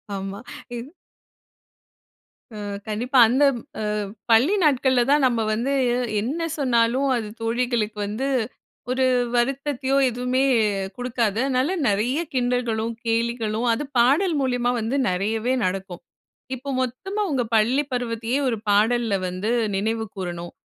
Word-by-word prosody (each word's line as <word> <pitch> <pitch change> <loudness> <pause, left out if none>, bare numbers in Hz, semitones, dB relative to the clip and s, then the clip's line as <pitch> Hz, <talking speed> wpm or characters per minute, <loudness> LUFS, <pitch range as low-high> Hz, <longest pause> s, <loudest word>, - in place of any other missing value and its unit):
ஆமா. 195 +1 -5 0.4
இந் 250 +7 -8 1.6
அ. - - -8 0.3
கண்டிப்பா. 245 +5 +1
அந்த 260 +5 +2
ம் 235 - -8 0.5
அ - - -10 0.2
பள்ளி 250 - +5
நாட்கள்ல 260 -4 +3
தான் 290 -1 +4
நம்ம 235 -2 0
வந்து, 245 +6 -1 0.5
என்ன 285 +9 -3 0.2
சொன்னாலும் 250 0 +2
அது 225 -3 -3
தோழிகளுக்கு 230 -2 -1
வந்து 215 +7 -3 0.6
ஒரு 260 +1 +1 0.3
வருத்தத்தையோ, 270 +2 0
எதுவுமே 250 +2 0 0.5
குடுக்காது. 235 -4 -1
அதனால 270 +6 +1
நெறைய 220 +8 +1
கிண்டல்களும் 245 -3 0
கேலிகளும், 230 0 0
அது 260 - -2 0.2
பாடல் 305 +8 +3
மூலியமா 245 -2 +1
வந்து 225 +4 -2
நெறையவே 220 +7 0
நடக்கும். 185 -1 -4 0.5
இப்போ 260 +3 -8
மொத்தமா 385 - -3
உங்க 260 -3 +1
பள்ளி 245 +7 +3
பருவத்தயே, 240 +1 -1
ஒரு 230 - 0
பாடல்ல 220 +1 +3
வந்து 185 +5 -2 0.2
நினைவு 220 +3 -1
கூறணும். 175 -2 -5
240 Hz, 120 wpm, -23 LUFS, 220-260 Hz, 1.6 s, பள்ளி